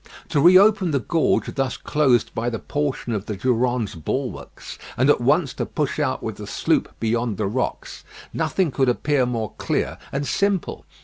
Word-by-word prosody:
To 145 - +2
re 180 +3 +8
open 200 -2 +4
the 140 -3 +1
gorge 160 +7 0
thus 135 -3 -1
closed 130 -6 +1
by 115 +2 -1
the 115 - -3
portion 140 -2 -3
of 105 -1 -3
the 105 - -3
Durande's 120 -1 0
bulwarks, 80 -4 -5 0.2
and 130 +4 +5
at - - +1
once 140 +3 +2
to - - -3
push - - -2
out - - -1
with - - -4
the - - -8
sloop - - -1
beyond 115 -2 -1
the 105 - -1
rocks, 120 +6 -3 0.3
nothing 165 +1 0
could 135 -1 +1
appear 130 +1 +1
more 115 -4 -3
clear - - -2
and 140 0 -2
simple. 200 +7 -1
130 Hz, 180 wpm, -22 LUFS, 115-150 Hz, 0.3 s, re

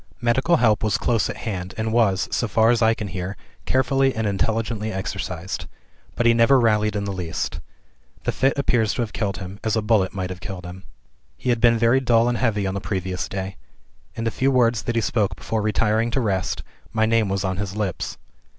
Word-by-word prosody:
"Medical 130 +8 +2
help 110 -8 +3
was 105 -1 +2
close 115 0 +1
at - - -5
hand, 95 -5 -5
and 110 0 -1
was 100 -6 +2
(so 115 - 0
far 110 +2 +4
as 120 - +1
I 110 0 +4
can 105 -3 -5
hear) 95 +2 -5 0.3
carefully 135 0 +2
and 110 0 -1
intelligently 110 +2 -1
exercised. 95 -2 -4 0.5
But 120 - 0
he 115 - +6
never 115 +4 +5
rallied 105 -2 +2
in 100 - -1
the 100 -1 -3
least. 90 -3 -3 0.6
The - - 0
fit 135 +1 +1
appears 120 -6 +1
to 120 - 0
have 110 - -6
killed 100 -3 -2
him, 95 +1 -8
as 110 -2 +1
a 110 - +1
bullet 105 -4 +2
might 90 -1 -4
have 90 - -8
killed 95 -3 -6
him. 90 +2 -9 0.5
"He - - -3
had 120 -1 0
been 115 -1 +5
very 115 +3 +4
dull 120 -2 +3
and 120 -1 0
heavy 105 -5 +1
on 95 - -1
the 100 - -3
previous 95 -3 -3
day. 95 -1 -5 0.6
In 115 - -4
the 115 - 0
few 135 +4 +1
words 120 -4 +3
that 120 +6 -3
he 115 - +2
spoke 105 -3 0
before 110 -1 -2
retiring 110 +2 +1
to 120 - 0
rest, 95 -6 -1 0.3
my 110 -1 +2
name 110 -2 +2
was 95 0 -1
on 95 -1 -1
his 100 0 -4
lips. 105 -5 -3
110 Hz, 215 wpm, -23 LUFS, 95-115 Hz, 0.6 s, he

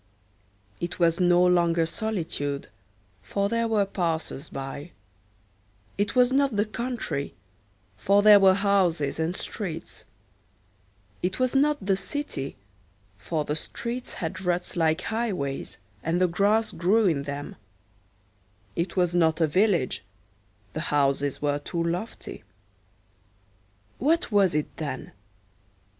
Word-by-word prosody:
It 175 0 -4
was 170 -1 +2
no 175 0 +5
longer 170 -2 +3
solitude, 160 -8 -3 0.5
for 200 - -1
there 230 +1 +1
were 215 -3 +2
passers 165 -6 -3
by; 140 +4 -6 1.0
it 205 +4 -1
was 250 0 +5
not 275 -3 +2
the 205 +1 +2
country, 235 - -3 0.6
for 200 +1 +3
there 210 -1 +9
were 190 -1 +6
houses 185 -8 +1
and 165 +3 -1
streets; 165 -6 -6 1.2
it 185 +1 -1
was 255 -1 +1
not 290 -5 +2
the 195 -1 +3
city, 195 - -4 0.6
for 150 +7 -2
the 150 - -1
streets 235 +8 -4
had 175 +2 -4
ruts 180 -1 -1
like 160 -2 +2
highways, 200 -12 -2 0.2
and 165 +2 0
the 185 - +4
grass 205 +5 +2
grew 200 +6 +2
in 160 -7 +2
them; 145 0 -5 1.2
it 170 +1 -2
was 180 -1 +2
not 165 -2 +3
a 165 - +5
village, 170 - +1 0.7
the - - -3
houses 140 -1 +1
were 145 0 +1
too 170 +3 -3
lofty. 175 - -4 1.6
What 320 0 +2
was 195 -5 +4
it, 150 - -2
then? 140 -4 -5
180 Hz, 120 wpm, -26 LUFS, 160-210 Hz, 1.6 s, there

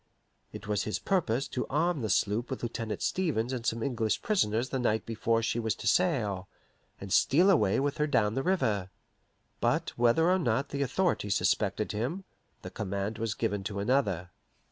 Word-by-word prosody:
It 105 - -9
was 105 -1 0
his 105 - -1
purpose 140 -9 0
to 125 - -3
arm 160 +1 0
his 110 -3 +2
sloop 105 +4 0
with 130 - -5
Lieutenant 115 -2 -3
Stevens 130 -10 0
and 125 -3 -3
some 115 0 -1
English 115 -6 -1
prisoners 130 - +1
the 135 - -2
night 110 -3 0
before 115 0 0
she 115 +1 0
was 110 -2 -1
to - - -9
sail, 115 - +1 0.5
and 100 -1 -5
steal 180 +8 +5
away 105 - +3
with 140 +1 -1
her 150 - +2
down 105 -7 +2
the 135 - -1
river. 110 - 0 0.7
But - - 0
whether 120 +8 +4
or 185 +1 +3
not 130 -3 0
the 140 - -3
authorities 135 - 0
suspected 105 0 0
him, 130 - -3 0.4
the - - -7
command 100 +2 -3
was 110 -2 -2
given 100 -1 -1
to 100 0 -4
another. 100 -6 0
115 Hz, 180 wpm, -29 LUFS, 105-140 Hz, 0.7 s, steal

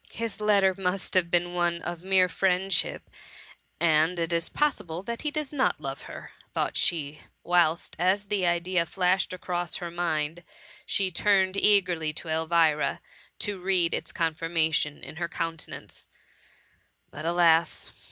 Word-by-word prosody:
*^ - - -22
His 230 -2 -4
letter 200 -3 +4
must 190 0 -2
have 180 -2 +3
been 175 0 +1
one 175 -1 +1
of 175 -1 -5
mere 185 0 +3
friendship 185 -1 0 0.7
and 160 +1 +3
it 165 0 -1
is 165 0 -1
possible 185 - -1
that 235 +3 -5
he 300 - -1
does 300 -1 -4
not 265 -2 +1
love - - -6
her/' - - -9 0.2
thought - - -1
she; 150 -3 0 0.2
whilst, 170 -2 +2
as 190 +3 +2
the 200 -2 -1
idea 175 0 +1
flashed 180 +2 +1
across 175 -1 -3
her 175 -2 -5
mind 165 -1 -2 0.5
she 190 -2 0
turned 190 +1 +2
eagerly 180 -6 +2
to 160 - -8
Elvira, 160 -1 +2 0.4
to 205 -2 -2
read 180 -2 +2
its - - -2
con 165 -1 0
firmation 160 -2 0
in - - -9
her 170 0 -2
countenance: 165 -1 -5 0.5
— - - -38
but, 155 - -8
alas 170 -1 +3
175 Hz, 150 wpm, -27 LUFS, 165-190 Hz, 0.7 s, letter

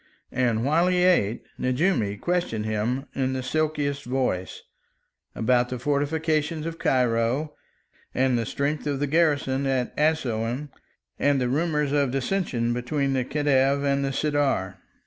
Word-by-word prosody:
And, 120 -3 +1
while 165 +5 +3
he 180 -1 +2
ate, 120 - +2 0.2
Nejoumi 130 - 0
questioned 175 -12 -1
him, 110 +5 -1
in 130 -1 -1
the 130 -1 -3
silkiest 145 -1 -1
voice, 125 -8 -2 0.7
about 125 +1 +2
the 125 - -3
fortifications 150 +3 0
of 165 0 -5
Cairo 125 +4 +1 0.6
and 130 -1 +1
the 115 -2 -1
strength 145 +2 -2
of 140 -2 -1
the 145 - +1
garrison 140 -3 +1
at 130 -2 -1
Assouan, 140 -3 0 0.5
and 145 -1 +3
the 125 -1 0
rumours 150 0 0
of 145 -2 +2
dissension 130 -4 -1
between 135 +3 -1
the 130 -1 +1
Khedive 140 0 +2
and 140 0 +1
the 135 - -1
Sirdar. 135 -10 0
135 Hz, 140 wpm, -25 LUFS, 125-150 Hz, 0.7 s, while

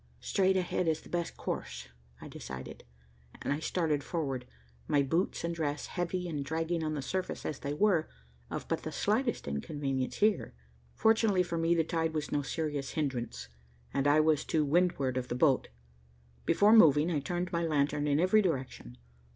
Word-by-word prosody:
"Straight 190 -1 +2
ahead 180 -1 0
is 160 -1 +1
the - - -15
best 170 -1 -3
course," - - -5 0.3
I - - -9
decided, 65 0 -8 0.5
and - - -1
I 145 - -3
started 160 -3 0
forward, 140 -6 -3 0.4
my 145 -1 +3
boots 165 +7 0
and 170 0 -1
dress, 150 -3 -2
heavy 180 0 -3
and 150 -4 -3
dragging 160 +3 -1
on 155 0 -1
the 140 - -3
surface 185 +5 -3
as 145 - -3
they 145 0 -3
were, 180 -3 +2 0.4
of - - -5
but - - -1
the - - -5
slightest 230 - 0
inconvenience 130 - -2
here. 210 - +1 0.4
Fortunately 220 -4 +3
for 170 -1 -3
me, 165 +1 +3
the 165 - +3
tide 160 -1 -1
was 150 -2 -2
no 145 - +1
serious 145 -1 -3
hindrance, 130 - -3 0.5
and 140 +1 +1
I 150 +2 +5
was 155 -1 +2
to 155 -2 +1
windward 140 -5 +1
of 125 -1 -2
the 120 - -3
boat. 135 0 +3 0.8
Before 210 +2 +5
moving 160 -6 +6
I 155 - +1
turned 175 +5 -3
my 170 - 0
lantern 150 -2 +1
in 145 0 +2
every 185 +5 +5
direction. 130 - -3
160 Hz, 175 wpm, -31 LUFS, 140-175 Hz, 0.8 s, moving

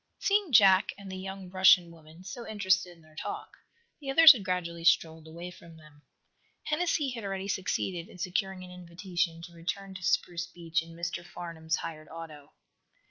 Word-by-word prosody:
Seeing 400 -4 +1
Jack 195 -4 +6
and 200 -1 -9
the - - -5
young 190 -1 -7
Russian 185 -2 +5
woman 160 +1 -15
so 230 +6 -8
interested 190 -4 +1
in 165 - -22
their 155 0 -21
talk, - - -6 0.5
the 280 -2 -7
others 325 +3 +10
had 240 -8 -1
gradually 175 -3 -3
strolled 160 -1 +2
away 170 +3 -8
from 170 -2 -15
them. 150 -2 -18 0.6
Hennessy 305 -3 0
had 235 -3 -6
already 195 -1 -4
succeeded 185 -2 -2
in - - -14
securing 185 +1 -2
an 180 - -11
invitation 175 -1 -3
to 170 0 -10
return 190 +4 -5
to 185 - -9
Spruce 175 +1 0
Beach 170 -1 -2
in 165 0 -12
Mr. 170 0 -4
Farnum's 165 -2 -4
hired 155 -1 -7
auto. 155 -3 -10
180 Hz, 175 wpm, -29 LUFS, 165-195 Hz, 0.6 s, others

